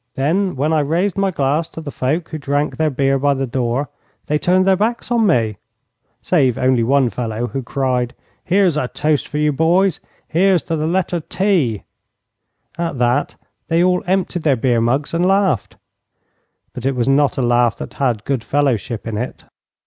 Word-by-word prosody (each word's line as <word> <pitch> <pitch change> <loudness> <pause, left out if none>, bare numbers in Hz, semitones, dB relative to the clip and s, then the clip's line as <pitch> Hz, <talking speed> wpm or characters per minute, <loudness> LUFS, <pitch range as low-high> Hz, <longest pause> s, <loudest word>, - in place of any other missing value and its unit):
Then 175 +8 0
when 150 +4 0
I 155 - +3
raised 170 +7 0
my 195 -1 +1
glass 150 0 0
to - - -9
the 155 -3 -6
folk 150 +7 -2
who 155 - -5
drank 145 +1 -1
their 160 -1 +2
beer 135 0 +1
by 140 +1 +2
the 135 0 -1
door 125 +2 -1 0.4
they 150 0 0
turned 185 +3 +2
their 190 0 +4
backs 230 +5 -2
on 230 -3 +3
me, 115 - +1 0.7
save 135 -9 +2
only 130 -2 +2
one 130 0 +2
fellow, 115 -1 -3
who 135 +2 -4
cried, 125 -1 -1 0.3
'Here's 185 -4 +2
a 130 - 0
toast 150 +2 -1
for 150 - -5
you, 150 0 +2
boys! 170 +4 +2 0.3
Here's 185 +1 +2
to 165 - -2
the 155 0 -1
letter 175 0 0
T!' 165 - 0 1.0
At 170 -4 -2
that 125 +4 +1 0.3
they 165 +1 +2
all 180 0 +2
emptied 185 -1 0
their 150 -4 +2
beer 120 -1 +1
mugs 135 +7 0
and 170 +1 +1
laughed; 190 - +1 1.0
but 125 - -7
it 135 0 0
was 120 0 0
not 140 +1 +2
a 130 - 0
laugh 120 -1 +2
that - - -7
had 120 -6 -1
good 135 -5 -1
fellowship 125 -6 -1
in 110 -2 -3
it. 125 - -6
145 Hz, 185 wpm, -18 LUFS, 125-175 Hz, 1.0 s, their